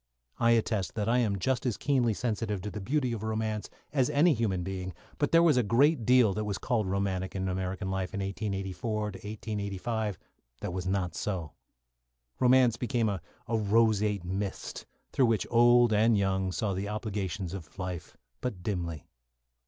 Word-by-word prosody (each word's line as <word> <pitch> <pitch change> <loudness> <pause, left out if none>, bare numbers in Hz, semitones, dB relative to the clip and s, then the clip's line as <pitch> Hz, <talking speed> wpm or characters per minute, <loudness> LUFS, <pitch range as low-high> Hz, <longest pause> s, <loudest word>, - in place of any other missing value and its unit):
I 115 0 +5
attest 110 -4 0
that 105 -1 -1
I 120 +2 +3
am 105 -5 +1
just 120 +5 0
as 125 -5 -1
keenly 125 -6 +2
sensitive 110 -3 -2
to 105 - -4
the 105 - -6
beauty 130 +3 0
of 110 - -4
romance 110 -1 -2 0.2
as 130 -4 +2
any 160 +4 +4
human 105 -7 0
being, 95 -1 -5 0.2
but 145 - +1
there 165 0 +6
was 155 -6 +5
a - - +5
great 120 +3 +3
deal 125 -5 +5
that 110 - -2
was 105 -2 -2
called 120 -6 0
romantic 95 -1 -1
in 95 0 -1
American 95 +1 -2
life 95 -1 -2
in - - -2
1884 100 +2 -3
1885 105 0 -3 0.4
that 90 - -3
was 90 0 -3
not 95 -3 0
so. 90 -6 -3 0.9
Romance 125 -2 +5
became 120 -3 0
a 95 -4 -3 0.3
roseate 105 -2 +2
mist, 95 +2 -4 0.2
through 130 - +3
which 115 -2 +1
old 120 -1 +6
and 110 +1 +4
young 95 -1 +1
saw 100 +1 -1
the 95 +2 -3
obligations 100 -4 -3
of 95 -2 -9
life 90 -3 -5 0.2
but 100 -8 -4
dimly. 85 -7 -3
105 Hz, 170 wpm, -29 LUFS, 95-115 Hz, 0.9 s, there